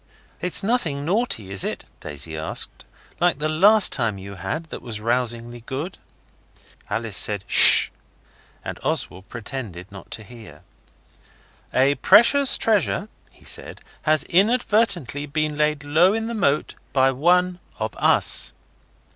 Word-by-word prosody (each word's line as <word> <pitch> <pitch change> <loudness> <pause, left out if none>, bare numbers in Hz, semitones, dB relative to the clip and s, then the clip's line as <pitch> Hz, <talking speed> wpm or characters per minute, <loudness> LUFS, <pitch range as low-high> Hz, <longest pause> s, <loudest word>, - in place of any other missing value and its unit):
'It's 180 +1 +1
nothing 165 - -2
naughty, 175 - -2
is 95 - +3
it,' - - -5
Daisy 75 +2 -5
asked, 80 0 -4 0.3
'like 175 -4 +1
the 150 +1 -3
last 195 +7 +5
time 115 -6 -2
you 100 +1 -10
had 95 - -5
that - - -8
was 110 -3 -7
rousingly 120 0 -3
good?' 145 +8 -6 0.9
Alice 115 -3 -3
said 100 +1 +2
'Shish', - - +8 0.7
and - - -7
Oswald 95 +2 -4
pretended 115 -6 -8
not 100 - -13
to 110 - -8
hear. 115 -1 -15 1.1
'A 135 +2 +2
precious 270 +5 +5
treasure,' 210 -1 0 0.2
he - - -22
said, - - -4 0.2
'has 155 -2 +1
inadvertently 195 - 0
been 155 +1 -3
laid 150 -1 -1
low 165 +7 +2
in 225 0 -3
the 235 - -5
moat 155 -9 -1 0.2
by 135 -1 +2
one 180 +6 +1 0.2
of - - -5
us. - - +3
145 Hz, 135 wpm, -21 LUFS, 115-180 Hz, 1.1 s, Shish